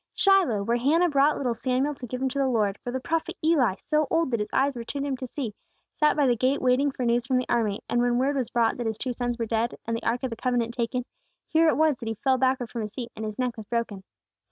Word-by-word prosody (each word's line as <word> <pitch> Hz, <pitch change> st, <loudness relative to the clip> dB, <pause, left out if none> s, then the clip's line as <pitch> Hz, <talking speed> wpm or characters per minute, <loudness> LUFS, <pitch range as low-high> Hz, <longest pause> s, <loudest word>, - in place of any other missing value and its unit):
Shiloh, 370 Hz, -, +3 dB
where 235 Hz, +3 st, +1 dB
Hannah 325 Hz, +8 st, +3 dB
brought 285 Hz, 0 st, +3 dB
little 250 Hz, -4 st, 0 dB
Samuel 260 Hz, +5 st, 0 dB
to 260 Hz, -3 st, -9 dB
give 255 Hz, +3 st, -4 dB
him 265 Hz, -, +1 dB
to 280 Hz, +2 st, -3 dB
the 270 Hz, -, +2 dB
Lord; 210 Hz, -5 st, 0 dB
where 245 Hz, -, -5 dB
the 260 Hz, -, -2 dB
Prophet 325 Hz, +5 st, -2 dB
Eli, 270 Hz, -, +3 dB
so 305 Hz, -1 st, 0 dB
old 330 Hz, -4 st, +1 dB
that 235 Hz, -, 0 dB
his 210 Hz, -, -2 dB
eyes 275 Hz, +1 st, +2 dB
were 240 Hz, -2 st, -6 dB
too 280 Hz, +4 st, -5 dB
dim 280 Hz, -1 st, -1 dB
to 255 Hz, -, -6 dB
see, 245 Hz, -4 st, -4 dB, 0.4 s
sat 300 Hz, 0 st, +3 dB
by 290 Hz, -, +4 dB
the 245 Hz, -2 st, +3 dB
gate 260 Hz, +4 st, +1 dB
waiting 255 Hz, +3 st, +3 dB
for 260 Hz, -2 st, -4 dB
news 235 Hz, 0 st, +2 dB
from 260 Hz, 0 st, +1 dB
the 255 Hz, -, 0 dB
army, 220 Hz, -4 st, 0 dB
and 240 Hz, -, +1 dB
when 240 Hz, 0 st, +2 dB
word 270 Hz, +3 st, +1 dB
was 255 Hz, -4 st, -1 dB
brought 235 Hz, -2 st, +2 dB
back -, -, -11 dB
that 240 Hz, -, -1 dB
his 220 Hz, -1 st, -2 dB
two 250 Hz, +1 st, -3 dB
sons 245 Hz, 0 st, -2 dB
were 230 Hz, -, -1 dB
dead, 225 Hz, +1 st, -1 dB
and 230 Hz, -, -1 dB
the 230 Hz, -, -4 dB
Ark 240 Hz, +3 st, -1 dB
of 260 Hz, -, -2 dB
the -, -, -3 dB
Covenant 240 Hz, -1 st, -1 dB
taken, 245 Hz, +1 st, -2 dB, 0.4 s
here 325 Hz, 0 st, +4 dB
it -, -, +3 dB
was 310 Hz, -3 st, +3 dB
that 230 Hz, -, -7 dB
he 225 Hz, -, -2 dB
fell 260 Hz, +4 st, +1 dB
backward 260 Hz, -2 st, +1 dB
from 235 Hz, -, -4 dB
his 210 Hz, -1 st, -5 dB
seat, 240 Hz, -2 st, -6 dB
and 220 Hz, -, -6 dB
his 215 Hz, -1 st, -5 dB
neck 250 Hz, -2 st, -1 dB
was 215 Hz, -2 st, -8 dB
broken. 230 Hz, -4 st, -2 dB
250 Hz, 290 wpm, -26 LUFS, 230-275 Hz, 0.4 s, by